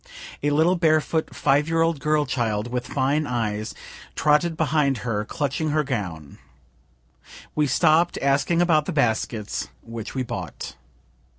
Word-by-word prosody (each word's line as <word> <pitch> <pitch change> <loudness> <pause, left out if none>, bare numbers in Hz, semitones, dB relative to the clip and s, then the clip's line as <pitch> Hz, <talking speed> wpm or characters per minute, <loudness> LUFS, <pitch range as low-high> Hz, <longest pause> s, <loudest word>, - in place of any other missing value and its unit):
A 145 - +1
little 160 +5 +3
barefoot 160 -1 +1
five 145 +2 +2
year 165 0 +2
old 165 -3 0
girl 150 +1 +1
child, 115 -3 -1
with 125 0 -3
fine 140 +3 0
eyes, 110 -3 -2 0.4
trotted 155 +2 +2
behind 150 -3 +2
her, 105 -3 -1
clutching 145 +4 -2
her 155 0 +1
gown. 90 - -5 1.1
We 150 -1 +1
stopp'd, 155 +6 +3
asking 140 +5 +2
about 155 -4 +3
the 185 - -2
baskets, 110 -5 -1 0.2
which 115 0 -7
we 130 - 0
bought. 90 - -6
140 Hz, 135 wpm, -24 LUFS, 115-155 Hz, 1.1 s, little